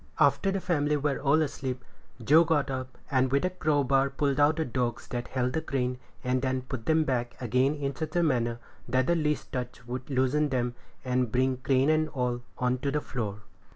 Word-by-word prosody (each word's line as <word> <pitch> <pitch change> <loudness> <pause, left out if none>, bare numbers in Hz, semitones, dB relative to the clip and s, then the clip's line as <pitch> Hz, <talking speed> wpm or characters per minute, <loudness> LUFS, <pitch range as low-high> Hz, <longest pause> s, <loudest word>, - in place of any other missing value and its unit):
After 195 - +4
the 195 - -1
family 150 -5 +1
were 145 -1 -1
all 145 +3 +3
asleep, 130 -3 -4 0.4
Joe 155 +8 +6
got 150 -4 +1
up, 130 -1 -5
and 130 -1 +2
with 140 +6 +2
a 185 - 0
crowbar 140 -5 +2
pulled 140 0 0
out 145 +2 +5
the 160 - -1
dogs 120 -2 -2
that 120 0 -3
held 125 -1 -1
the 160 - 0
crane, 125 -3 -2 0.2
and 125 0 +1
then 130 -1 -1
put 130 -3 -6
them 160 0 +4
back 120 -4 -2
again 130 +4 +2
in 140 -2 -3
such 155 +2 -5
a 175 - +3
manner 120 -6 +1 0.3
that 130 +1 +2
the 170 - +2
least 150 -3 -1
touch 125 -2 -5
would 125 +2 -6
loosen 135 +3 +2
them, 125 -2 0 0.3
and 125 -2 0
bring 130 +1 +2
crane 135 +3 +2
and 155 0 +2
all 125 -3 -2 0.2
on 125 0 0
to 140 - -1
the 150 +2 0
floor. 105 -7 -5
130 Hz, 205 wpm, -28 LUFS, 125-150 Hz, 0.4 s, Joe